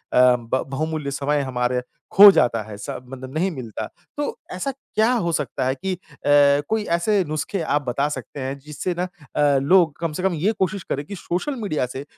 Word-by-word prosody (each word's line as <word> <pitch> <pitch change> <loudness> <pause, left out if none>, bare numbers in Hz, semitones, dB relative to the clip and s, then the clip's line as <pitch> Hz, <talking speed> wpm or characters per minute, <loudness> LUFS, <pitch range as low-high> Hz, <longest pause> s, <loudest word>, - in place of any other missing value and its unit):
ब 125 0 +4
बहुमूल्य 150 +1 -3
समय 145 +1 0
हमारे 125 -1 -1 0.3
खो 205 +1 +10
जाता 120 - +2
है 105 - -7
स - - -8 0.2
मतलब 130 0 -9
नहीं 170 +5 +1
मिलता। 125 - -6 0.3
तो 290 0 -2 0.2
ऐसा 185 +10 -2
क्या 240 -3 0
हो 170 - +1
सकता 140 -6 -2
है 130 +1 +1
कि 190 +8 -3
अ, - - -5 0.7
कोई 220 -1 +1
ऐसे 200 +3 +2
नुस्खे 155 +5 -3
आप 145 -2 +1
बता 140 +4 +1
सकते 150 - -7
हैं 135 +1 -3
जिससे 150 +5 -4
ना - - +1 0.3
अ, 145 -2 +4
लोग 165 +1 +4
कम 165 -1 -1
से 180 - -4
कम 190 -1 +2
ये 170 +7 +1
कोशिश 190 0 0
करे 140 - -1
कि 200 +7 -8
सोशल 185 +10 -3
मीडिया 155 -11 -1
से 130 +2 -6
150 Hz, 195 wpm, -22 LUFS, 130-185 Hz, 0.7 s, खो